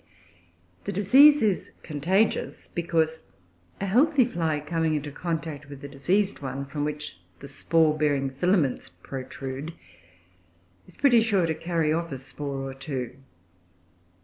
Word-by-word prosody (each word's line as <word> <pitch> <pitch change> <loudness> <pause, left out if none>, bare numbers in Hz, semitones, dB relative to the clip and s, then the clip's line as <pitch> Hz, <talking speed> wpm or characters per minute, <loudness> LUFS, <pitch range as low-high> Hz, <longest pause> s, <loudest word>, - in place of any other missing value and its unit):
The 200 - -2
disease 270 +10 +6
is 205 -4 0
"contagious," 180 +8 0
because 160 -2 -1 0.6
a 195 - -2
healthy 260 +6 +4
fly 165 -9 -1
coming 160 +1 0
in 150 0 -3
contact 155 -2 -4
with 140 -1 -10
a - - -5
diseased 180 +9 0
one, 135 0 -4
from 145 +1 -4
which 150 -11 -5 0.2
the 140 - -10
spore 155 +3 +2
bearing 145 -3 +1
filaments 150 - +1
protrude, 135 - -7 1.1
is - - -18
pretty 245 -5 +5
sure 205 -6 +2
to 160 - 0
carry 160 -1 0
off 170 0 -2
a 135 - -4
spore 135 +1 -6
or 135 - -6
two. 135 -2 -5
155 Hz, 135 wpm, -26 LUFS, 140-180 Hz, 1.1 s, disease